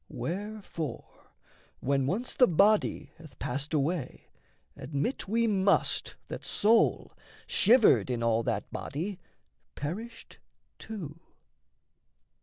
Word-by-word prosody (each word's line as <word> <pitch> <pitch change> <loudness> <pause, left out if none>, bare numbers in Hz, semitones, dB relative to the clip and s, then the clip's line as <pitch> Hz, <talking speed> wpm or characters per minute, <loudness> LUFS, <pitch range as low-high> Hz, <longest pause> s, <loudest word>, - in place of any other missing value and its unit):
Wherefore, 195 -4 -6 0.5
when 135 0 +1
once 215 - -2
the 250 - +5
body 195 -5 +2
Hath 155 -6 -14
passed 140 +4 -4
away, 150 -1 -2 0.5
admit 150 - -3
we 230 +3 +2
must 200 -2 +1
that - - -7
soul, 220 +2 +2 0.3
Shivered 230 - +4
in 120 -2 -1
all 115 -1 +2
that 115 -4 -3
body, 180 +7 -4 0.6
perished 215 - -7 0.4
too. 170 -8 -7
170 Hz, 95 wpm, -29 LUFS, 140-215 Hz, 0.6 s, the